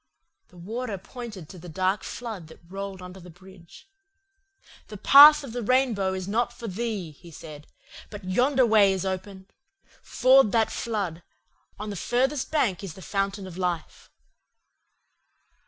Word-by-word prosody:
"The 180 - -20
Warder 220 +4 -5
pointed 210 - -9
to 185 - -11
the 175 +1 -11
dark 190 +4 0
flood 220 -9 -7
that 160 - -15
rolled 195 0 -7
under 180 +1 -10
the 180 0 -13
bridge. 185 - -16 1.0
"'The 210 - -9
path 295 +7 +8
of 270 - -8
the 245 - -3
rainbow 225 -6 +1
is 185 -1 -5
not 235 +4 0
for 235 -1 -9
thee,' 205 -4 -4
he 170 +4 -16
said, 150 -2 -11 0.4
'but 205 -1 -9
yonder 250 +7 +2
way 210 -4 +4
is 190 0 -3
open. 190 0 -5 0.6
Ford 260 -3 +4
that 225 -1 +2
flood. 200 -8 -3 0.6
On 210 +1 -6
the - - -6
furthest 260 - -1
bank 225 - 0
is 190 -5 -7
the 190 - -12
fountain 195 0 -2
of 185 -1 -9
life. 175 -3 -4
195 Hz, 155 wpm, -25 LUFS, 185-235 Hz, 1.0 s, path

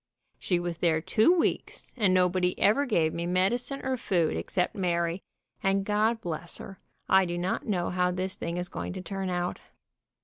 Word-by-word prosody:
She 180 -2 0
was 175 -1 -4
there 160 -2 +2
two 215 - +3
weeks, 355 -2 -1
and 210 -6 +2
nobody 180 0 +2
ever 275 +8 +3
gave 165 -9 +2
me 170 +1 -3
medicine 235 +10 0
or 260 -1 0
food 175 -8 0
except 180 - -1
Alary, 170 -1 0 0.4
and 195 0 +1
God 215 +2 +1
bless 170 -1 -4
her, 195 - -10 0.3
I 190 0 +5
do 175 -1 -3
not 180 +2 -2
know 180 -5 0
how 180 0 +1
this 185 +1 -2
thing 170 +1 -4
is 180 0 -2
going - - -5
to 185 - -6
turn 195 -1 -4
out. 175 0 -2
185 Hz, 180 wpm, -28 LUFS, 175-200 Hz, 0.4 s, I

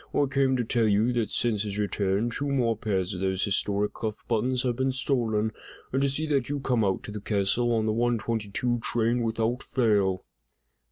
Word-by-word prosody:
I 145 - +3
came 135 -1 +1
to 120 - 0
tell 115 0 +1
you 110 +4 +2
that 115 -3 0
since 110 -4 0
his 105 -1 -3
return, 105 +2 0
two 145 +4 -2
more 120 -4 +1
pairs 100 -3 -1
of 90 - -5
those 95 0 0
historic 100 0 0
cuff 110 -2 -5
buttons 125 +3 +1
have 125 -2 0
been 130 +2 0
stolen, 115 -5 0 0.4
and 135 - +1
to 140 - +3
see 150 +4 0
that 140 -5 0
you 145 0 -2
come 125 -4 +1
out 95 -2 0
to - - -7
the 105 -1 -6
castle 105 +4 +1
on 110 -2 +1
the 110 - +1
one 120 +1 +1
twenty 110 -1 -3
two 120 +3 0
train 120 +1 0
without 115 +2 -1
fail!" 100 -7 +1
115 Hz, 210 wpm, -27 LUFS, 105-125 Hz, 0.4 s, I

